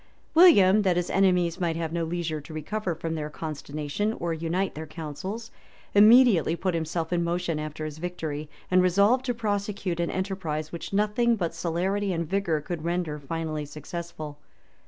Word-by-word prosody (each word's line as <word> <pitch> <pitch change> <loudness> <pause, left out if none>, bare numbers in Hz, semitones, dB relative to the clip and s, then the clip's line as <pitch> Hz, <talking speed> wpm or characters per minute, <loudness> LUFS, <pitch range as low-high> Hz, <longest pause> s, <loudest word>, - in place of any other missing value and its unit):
William, 215 - +7
that 185 -3 +2
his 175 - -1
enemies 180 -3 +2
might 170 -3 0
have 165 -1 -3
no 170 -1 0
leisure 165 -2 -2
to 155 +2 -10
recover 180 +3 -3
from 165 0 -4
their 150 -2 -3
consternation 155 +6 -3
or 170 -6 -2
unite 170 +4 -1
their 160 +1 -7
counsels, 165 +9 -6 0.4
immediately 210 - +6
put 185 +1 -1
himself 165 +1 -2
in 170 -1 +1
motion 170 -2 -1
after 155 0 -5
his 155 0 -6
victory, 155 -4 -4 0.2
and 185 0 +6
resolved 200 +8 +4
to 245 - 0
prosecute 205 -5 -2
an 170 - 0
enterprise 185 -5 -3
which 170 - -6
nothing 210 +4 +2
but 175 -6 -2
celerity 190 +4 -1
and 170 -1 -2
vigor 170 -4 0
could 165 0 -5
render 170 -3 -2
finally 155 +1 -3
successful. 155 0 -7
170 Hz, 165 wpm, -27 LUFS, 155-195 Hz, 0.4 s, William